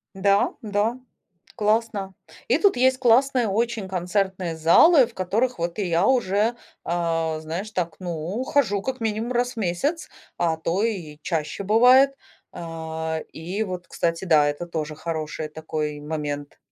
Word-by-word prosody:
Да, 200 +1 +2
да, 215 +3 0 0.6
классно. 210 -2 0 0.3
И - - +3
тут 405 -10 +3
есть 260 +1 +3
классные 250 -1 +3
очень 225 -1 -1
концертные 185 -1 -1
залы, 240 - +6
в 235 - -17
которых 215 +4 -1
вот 170 +2 -2
и 205 - -1
я 170 +2 +2
уже, 225 -2 +2 0.3
а, 165 -2 -1
знаешь, 170 +7 -5
так, 170 -4 -2
ну, 175 +4 -4
хожу 205 -9 +1
как 260 +2 -4
минимум, 225 +2 -1
раз 245 +1 0
в - - -24
месяц, 225 - -1 0.3
а 165 -2 +1
то 170 +6 -1
и 170 -9 -4
чаще 155 +2 -3
бывает. 250 +6 +5 0.4
Э, 160 -1 -4
и 180 +7 -3
вот, 180 -3 -6
кстати, 165 +2 -1
да, 155 -5 +4
это 145 +4 -3
тоже 155 -2 -4
хороший 155 -1 -4
такой 155 -1 -4
момент. 145 -1 -5
190 Hz, 145 wpm, -24 LUFS, 160-225 Hz, 0.6 s, залы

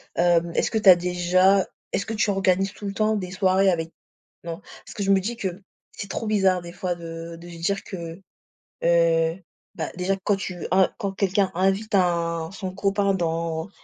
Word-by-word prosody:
hem, 170 -1 +3
est-ce - - +1
que 220 - 0
tu 210 -3 +5
as 180 - +11
déjà 180 +2 +3 0.3
est-ce 200 - -1
que 225 - -4
tu 215 0 +1
organises 195 0 +1
tout 205 - -10
le 195 - -3
temps 215 +1 +1
des 185 -3 -4
soirées 190 0 +3
avec 165 -1 -2 0.5
non? 170 -1 -5 0.3
Parce - - -10
que 205 - -2
je 195 - +2
me 195 - +5
dis 225 +5 -3
que 190 -2 -4 0.3
c'est 200 - -8
trop 225 - -3
bizarre 190 -4 +2
des 170 0 -9
fois 180 -1 -2
de 165 0 -8
de 175 +1 -11
se 170 - -10
dire 195 +4 -1
que, 170 -1 -7 0.6
heu, 170 +1 +3 0.3
bah, - - -3
déjà 185 +2 0
quand 205 - +2
tu 180 -3 -5
un, 190 0 +4
quand 200 -4 -2
quelqu'un 195 0 +1
invite 195 +3 +1
un 170 -3 +1
son 190 -2 -6
copain 200 0 +1
dans 165 -1 -2
185 Hz, 200 wpm, -24 LUFS, 170-195 Hz, 0.6 s, as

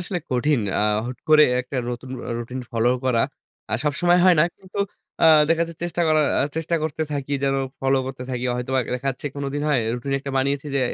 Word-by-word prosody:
আসলে 180 +1 -3
কঠিন। 130 +2 +2 0.2
আ - - +2 0.3
হুট 125 0 -6
করে 155 -1 +7 0.2
একটা 130 +2 -7
নতুন 125 +1 -7 0.2
অ - - -4
রুটিন 125 +2 -5
ফলো 115 +1 +2 0.2
করা। 125 -3 +2 0.5
আ - - -4
সবসময় 175 +4 +3
হয় 185 -1 +7
না। - - +6
কিন্তু 190 +1 -10 0.4
আ - - +7 0.2
দেখা 165 0 +3
যাচ্ছে 165 - -10
চেষ্টা 175 0 -1
করার 155 -1 +3
আ - - +3
চেষ্টা 165 +1 -1
করতে 155 0 -2
থাকি 140 -1 -3
যেন 135 0 +2 0.3
ফলো 135 0 +2
করতে 130 -1 -6
থাকি। 125 -1 -3
হয়তোবা 130 +2 -1 0.2
দেখা 135 +2 -3
যাচ্ছে 135 +2 -6
কোনো 140 0 -3
দিন 145 - -2
হয়। 145 -5 +3
রুটিন 125 +3 -4
একটা 140 0 -5
বানিয়েছি 140 +2 0
যে - - +2
140 Hz, 215 wpm, -23 LUFS, 130-155 Hz, 0.5 s, করে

